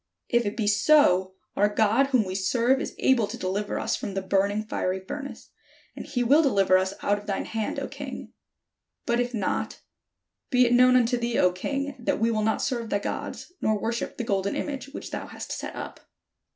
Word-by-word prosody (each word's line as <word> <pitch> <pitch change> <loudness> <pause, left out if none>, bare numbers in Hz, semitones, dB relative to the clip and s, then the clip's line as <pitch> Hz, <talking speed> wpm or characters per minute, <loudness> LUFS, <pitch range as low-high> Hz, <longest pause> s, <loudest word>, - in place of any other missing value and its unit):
If 240 -3 +2
it 205 - -4
be 220 - 0
so, 205 -4 +4 0.2
our 205 +1 +3
God 220 +6 +3
whom 255 -5 +3
we 185 - -4
serve 235 +7 +2
is - - -5
able 240 -5 +3
to - - -6
deliver 200 +3 -2
us - - 0
from 195 - -5
the 195 - -2
burning 200 +2 +1
fiery 185 -3 -2
furnace, 275 +9 -8 0.4
and - - -8
he 245 -2 -1
will 280 +7 +5
deliver 200 -10 +3
us 190 +1 +1
out 205 0 +1
of 205 - -15
thine 195 - -2
hand, 220 -1 -3
O - - -4
king. - - -8 0.7
But 235 -1 +1
if 245 0 0
not, 205 -4 -2 0.7
be 250 -1 +4
it 240 - +2
known 250 +1 +6
unto 245 0 +3
thee, 235 0 -1
O 180 - +4
king, 275 +9 -3
that 240 - -1
we 230 +1 +2
will 215 -1 0
not 220 +1 0
serve 235 -3 -2
thy - - +1
gods, 205 - -5
nor 215 -1 +1
worship 230 +3 -3
the 240 - -2
golden 200 -2 -1
image 280 -2 -4
which 275 - -8
thou - - -5
hast - - -8
set - - -5
up." - - -7
220 Hz, 205 wpm, -26 LUFS, 200-250 Hz, 0.7 s, known